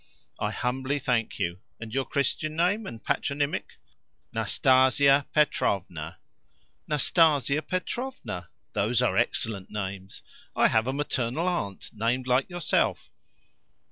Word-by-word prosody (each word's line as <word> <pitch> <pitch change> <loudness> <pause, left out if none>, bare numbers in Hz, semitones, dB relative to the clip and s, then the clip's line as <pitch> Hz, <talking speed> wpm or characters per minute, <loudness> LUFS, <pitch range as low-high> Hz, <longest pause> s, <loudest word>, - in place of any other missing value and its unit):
"I - - 0
humbly 130 +3 -1
thank 120 -4 0
you. 85 +1 -2 0.2
And 115 -1 -8
your 135 0 0
Christian 155 +3 -1
name 185 +6 +1
and 115 -2 -8
patronymic?" 145 +1 -1 0.6
"Nastasia 135 +2 +4
Petrovna." 90 - 0 0.7
"Nastasia 150 -1 +3
Petrovna! 185 - -4 0.2
Those 105 +3 +2
are - - +2
excellent 100 -4 0
names. 95 -2 -5 0.3
I - - +5
have 110 +1 +2
a - - +1
maternal 140 +2 -1
aunt 100 - -3
named 120 +4 0
like 130 +4 +2
yourself." 175 -3 0
130 Hz, 110 wpm, -27 LUFS, 110-150 Hz, 0.7 s, I